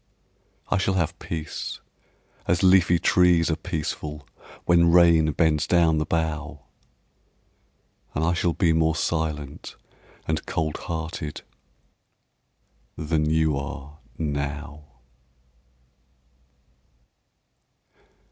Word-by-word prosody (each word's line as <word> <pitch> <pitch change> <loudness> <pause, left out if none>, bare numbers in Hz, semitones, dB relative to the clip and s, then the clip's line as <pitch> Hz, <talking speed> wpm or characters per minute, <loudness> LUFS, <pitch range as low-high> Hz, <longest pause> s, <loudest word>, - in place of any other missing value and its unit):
I 105 - +2
shall 95 0 0
have 85 -4 -1
peace, 80 -2 -5 0.7
as 85 0 +1
leafy 90 -2 +5
trees 85 -1 +3
are - - +1
peaceful 75 -2 -5 0.4
When 85 -1 +4
rain 85 -3 +5
bends 80 -1 +1
down 85 -3 +3
the 75 - -2
bough, 80 -2 -2 1.5
And 75 - 0
I 85 - +2
shall 85 0 0
be 85 -2 +2
more 80 0 +2
silent 75 -4 -3 0.5
and 80 -1 -1
cold 80 -2 -2
hearted 80 -2 -5 1.5
Than 75 0 0
you 80 -1 +2
are 70 +1 -7 0.2
now. 75 0 -4
80 Hz, 90 wpm, -24 LUFS, 75-85 Hz, 1.5 s, leafy